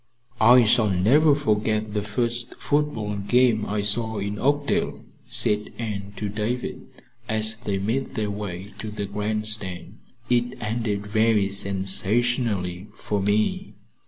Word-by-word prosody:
"I 120 Hz, +3 st, +7 dB
shall 110 Hz, -1 st, +3 dB
never 135 Hz, -, +4 dB
forget 110 Hz, -5 st, 0 dB
the 105 Hz, -, 0 dB
first 120 Hz, +3 st, -2 dB
football 130 Hz, -9 st, -1 dB
game 110 Hz, +2 st, +2 dB
I 105 Hz, 0 st, -1 dB
saw 110 Hz, +2 st, +1 dB
in 100 Hz, +1 st, -3 dB
Oakdale," 145 Hz, +1 st, 0 dB, 0.2 s
said 105 Hz, 0 st, +2 dB
Anne 100 Hz, -3 st, -5 dB
to 105 Hz, -, -3 dB
David 110 Hz, +5 st, -3 dB, 0.4 s
as 110 Hz, 0 st, 0 dB
they 100 Hz, -2 st, 0 dB
made 115 Hz, +8 st, -2 dB
their 105 Hz, -2 st, -1 dB
way 100 Hz, -3 st, -5 dB
to 110 Hz, -, -4 dB
the 105 Hz, -1 st, -4 dB
grandstand. 105 Hz, -2 st, -2 dB, 0.3 s
"It 120 Hz, +1 st, 0 dB
ended 105 Hz, -2 st, -2 dB
very 110 Hz, -1 st, +2 dB
sensationally 100 Hz, 0 st, 0 dB
for 105 Hz, -1 st, -2 dB
me." 105 Hz, +2 st, 0 dB
105 Hz, 130 wpm, -24 LUFS, 100-120 Hz, 0.4 s, I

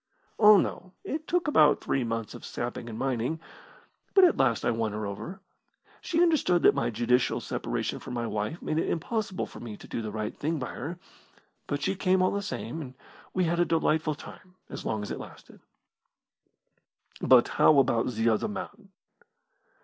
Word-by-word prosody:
"Oh, 210 Hz, -1 st, +9 dB
no, 185 Hz, -1 st, -2 dB
it 310 Hz, +2 st, -4 dB
took 350 Hz, -2 st, 0 dB
about 150 Hz, -, +5 dB
three 135 Hz, -, -1 dB
months 115 Hz, -1 st, -3 dB
of -, -, -10 dB
sapping 120 Hz, -1 st, -5 dB
and 110 Hz, -, -6 dB
mining. 130 Hz, +4 st, -1 dB, 0.8 s
But 385 Hz, -, +8 dB
at 350 Hz, -, +6 dB
last 120 Hz, -4 st, +1 dB
I -, -, +3 dB
won 110 Hz, -2 st, -1 dB
her 105 Hz, 0 st, -3 dB
over. 170 Hz, -, -6 dB, 0.6 s
She 335 Hz, +1 st, +2 dB
understood 295 Hz, -, +3 dB
that -, -, +7 dB
my 115 Hz, -, 0 dB
judicial 120 Hz, +2 st, +1 dB
separation -, -, -3 dB
from -, -, -7 dB
my 120 Hz, -1 st, -2 dB
wife 105 Hz, +8 st, -3 dB
made 155 Hz, -, 0 dB
it -, -, -1 dB
impossible 200 Hz, +3 st, -2 dB
for -, -, -12 dB
me 110 Hz, -3 st, -7 dB
to -, -, -13 dB
do -, -, -4 dB
the 110 Hz, -, -4 dB
right 105 Hz, 0 st, -4 dB
thing 160 Hz, +3 st, -2 dB
by 130 Hz, -, -4 dB
her 160 Hz, +7 st, -5 dB, 0.7 s
but 145 Hz, 0 st, -2 dB
she 190 Hz, -, +1 dB
came 185 Hz, -1 st, +2 dB
all 185 Hz, -, +3 dB
the 200 Hz, -, -1 dB
same, 165 Hz, -, -5 dB
and 130 Hz, -3 st, -9 dB, 0.4 s
we 185 Hz, -, +2 dB
had 170 Hz, 0 st, 0 dB
a -, -, +5 dB
delightful 160 Hz, -2 st, +1 dB
time, 180 Hz, +5 st, -13 dB, 0.2 s
as -, -, -6 dB
long 110 Hz, -1 st, -2 dB
as 105 Hz, -, -6 dB
it -, -, -4 dB
lasted." -, -, -12 dB, 1.6 s
"But 125 Hz, -2 st, +6 dB
how 155 Hz, -, +7 dB
about 125 Hz, -4 st, +3 dB
the 115 Hz, -1 st, -1 dB
other 110 Hz, -, +1 dB
man?" 210 Hz, -1 st, -7 dB
145 Hz, 190 wpm, -28 LUFS, 115-185 Hz, 1.6 s, Oh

